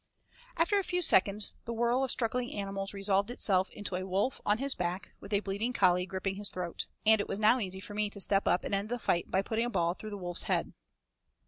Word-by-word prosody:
After 400 +5 +3
a - - -2
few 360 -1 0
seconds 200 - +5
the 235 - -4
whirl 240 +3 +1
of 265 - -1
struggling 245 +1 0
animals 195 -1 -1
resolved 200 +1 0
itself 190 -6 +1
into 205 -3 -6
a 185 - -2
wolf, 195 +7 -1
on 210 +1 +3
his 275 +3 0
back, 180 +2 -4
with 200 - -12
a 200 -1 +2
bleeding 205 +5 -3
collie 180 -4 +3
gripping 190 0 -3
his 205 0 -2
throat, 180 -2 -5 0.2
and 220 -1 +6
it - - -5
was 195 - -3
now 220 +4 +4
easy 190 -3 -4
for 205 +1 -10
me 210 0 -1
to 205 - -9
step 195 0 +2
up 180 - +2
and - - -4
end 200 +2 -1
the 245 - -2
fight 175 -7 -1
by 190 - +1
putting 225 +3 -1
a - - -2
ball 170 -6 0
through 215 +3 -9
the 205 - -6
wolf's 175 -2 -2
head. - - 0
200 Hz, 240 wpm, -30 LUFS, 190-230 Hz, 0.2 s, and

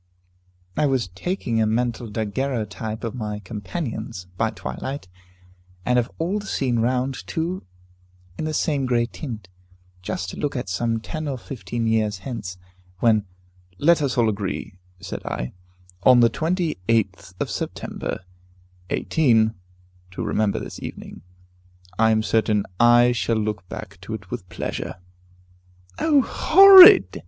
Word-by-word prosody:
"I 150 - +2
was 130 -8 0
taking 115 - -2
a 110 - +2
mental 120 +1 -1
daguerreotype 110 0 -3
of 115 - -3
my 105 -4 -4
companions, 105 - -6
by 110 +4 +1
twilight, 110 +5 -6 0.8
and 125 0 +3
of 120 +1 -2
all 180 +6 -1
the 205 - -9
scene 125 -8 0
round, 125 +3 0
too, 170 +3 -2 0.7
in 155 - -4
the 155 - -2
same 140 -4 0
grey 120 -1 +2
tint, 115 - -8 0.5
just 90 0 -4
to - - -9
look 145 - -2
at 125 -7 -4
some 115 +4 -1
ten 155 +4 -5
or 135 -2 -3
fifteen 120 -2 -5
years 110 -2 +1
hence, 105 -9 -5 0.4
when 110 -1 +2 0.2
" 90 0 -33
"Let 170 -2 +5
us 135 -3 -1
all 120 - +4
three 110 - +3
agree," 100 -2 -5 0.2
said - - -7
I, - - -4 0.5
"on 125 +3 +6
the 115 -1 +5
28th 115 - -1
of - - -2
September, - - -4 0.7
18, 115 -8 +2 0.6
to 90 - -5
remember 105 -2 0
this - - -7
evening. - - -8 0.8
I 110 0 +5
am 110 0 +2
certain 110 -2 +1
I 120 +1 +6
shall 115 -1 0
look 105 -4 -3
back - - -9
to 110 - -5
it 100 -4 -11
with 90 - -6
pleasure." - - -4 1.0
"O 290 -4 +4
horrid!" 390 - +8
115 Hz, 145 wpm, -23 LUFS, 105-135 Hz, 1.0 s, horrid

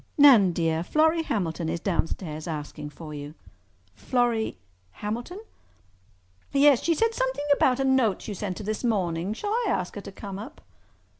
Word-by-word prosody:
"Nan, 250 -11 +7
dear, 165 -1 0
Florrie 320 - +3
Hamilton 175 - -2
is 170 - -2
downstairs 165 -3 -2
asking 150 -1 -5
for 155 0 -10
you." 145 +1 -7 0.6
"Florrie—Hamilton?" 220 - -3 1.1
"Yes. 280 -2 +5
She 335 - +1
said 455 +6 +1
something - - -1
about 260 -2 +2
a - - +2
note 260 -7 +2
you 210 - -3
sent 190 -1 -4
her - - -6
this 215 +3 -3
morning. 185 -5 0
Shall 410 - -4
I 470 +2 +1
ask 180 - -1
her 205 - -6
to 200 - -9
come 195 0 -7
up?" 250 +9 -9
205 Hz, 155 wpm, -26 LUFS, 165-270 Hz, 1.1 s, Nan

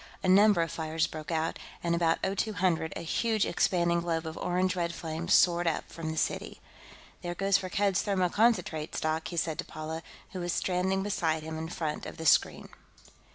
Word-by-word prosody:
A - - 0
number 200 -1 +6
of 165 - -4
fires 160 -1 -1
broke 155 -1 -7
out, 160 -1 -1 0.2
and 170 -1 +1
at - - +3 0.3
about 195 - 0
0200 185 -7 0
a - - -4
huge 220 +5 +1
expanding 170 -1 +1
globe 165 -1 -2
of 160 0 -5
orange 185 +1 0
red 170 -1 -2
flame 160 0 -5
soared 175 -1 +4
up 165 - -1
from 165 -1 -5
the 160 - -4
city. - - -2 0.6
"There 175 0 -4
goes 195 +1 +2
Firkked's 195 0 +1
thermoconcentrate 185 -4 +1
stock," 160 +1 -1
he 170 - -6
said 160 -1 -1
to - - 0
Paula, 155 +1 -6 0.3
who 185 - -5
was 175 -1 -2
standing 190 +1 0
beside 165 -6 0
him 160 0 -5
in 160 0 -5
front 155 -3 -3
of - - -9
the 160 - -6
screen. - - +3
170 Hz, 190 wpm, -29 LUFS, 160-185 Hz, 0.6 s, number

